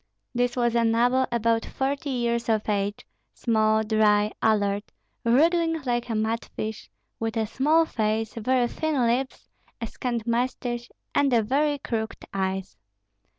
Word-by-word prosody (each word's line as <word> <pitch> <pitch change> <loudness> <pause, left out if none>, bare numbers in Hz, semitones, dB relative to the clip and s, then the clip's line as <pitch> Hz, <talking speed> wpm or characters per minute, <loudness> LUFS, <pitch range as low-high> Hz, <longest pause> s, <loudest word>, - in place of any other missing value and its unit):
This 245 0 0
was 240 -2 +1
a 235 -1 +3
noble 245 +3 +3
about 230 -1 +1
forty 280 +2 -2
years 235 -2 -1
of 215 -1 +1
age, 205 -1 -1 0.3
small, 220 -2 +2
dry, 210 -1 +3
alert, 205 -2 +1 0.3
wriggling 325 +7 +3
like 240 -1 -1
a 225 - -1
mud 220 +1 0
fish, 220 0 -5 0.3
with 225 0 -2
a 220 - +1
small 305 +9 +3
face, 220 -4 -1
very 245 +2 +1
thin 315 +1 -1
lips, 250 +3 -1 0.3
a 230 - -3
scant 235 0 -3
mustache, 240 0 -1 0.2
and 285 - +3 0.2
very 290 +3 +2
crooked 225 -4 -4
eyes. 190 - -2
235 Hz, 140 wpm, -26 LUFS, 220-255 Hz, 0.3 s, a